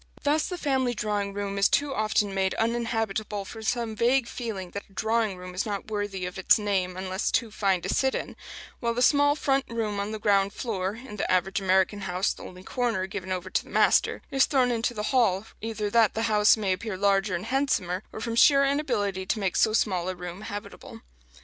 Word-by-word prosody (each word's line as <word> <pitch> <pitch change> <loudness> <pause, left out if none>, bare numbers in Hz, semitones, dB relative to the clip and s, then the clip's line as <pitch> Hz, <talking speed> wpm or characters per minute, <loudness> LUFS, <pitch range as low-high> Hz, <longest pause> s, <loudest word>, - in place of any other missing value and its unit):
Thus 300 +2 +2
the 360 - -4
family 265 -6 0
drawing 205 -2 -1
room 200 0 -3
is 200 - +4
too 285 -1 +1
often 215 -3 0
made 190 -1 0
uninhabitable 225 -3 -1
from 225 +3 -9
some 230 0 -1
vague 245 +2 +2
feeling 205 -8 -5
that 200 - -7
a - - -22
"drawing 220 -1 0
room" 180 0 -9
is 180 - -1
not 210 0 -5
worthy 205 -3 -3
of 180 +1 -6
its 190 - +5
name 190 -4 -1
unless 185 +2 -2
too 230 -3 0
fine 195 -4 0
to - - -3
sit 265 -1 +1
in; - - -5 0.4
while 235 -1 -1
the 245 - +2
small 285 +1 +4
front 275 -3 +1
room 220 -3 -2
on 200 +1 -2
the 220 - -4
ground 200 -2 +2
floor 200 -4 -3
in 235 -2 -10
the - - -1
average 185 +2 +1
American 190 +2 +2
house 185 0 0
the - - -14
only 185 0 -10
corner 230 -5 -1
given 190 -1 -6
over 185 0 -3
to - - +1
the - - -17
master - - +3
is 270 -1 +3
thrown 255 -3 +2
into 235 +1 -1
the 210 - -3
hall, 220 -6 +3 0.2
either 220 -1 -3
that 225 -3 +4
the 225 - -1
house 215 -1 +4
may 200 -3 0
appear 200 +1 -4
larger 195 -1 +2
and 175 +4 -4
handsomer, 225 -9 0
or - - -7
from 230 +1 -3
sheer 275 +3 +6
inability 240 -10 0
to - - 0
make 195 -4 -1
so 220 - +4
small 185 -5 +1
a 185 - -3
room 180 +2 -7
habitable. 205 -1 -8
210 Hz, 215 wpm, -27 LUFS, 190-235 Hz, 0.4 s, sheer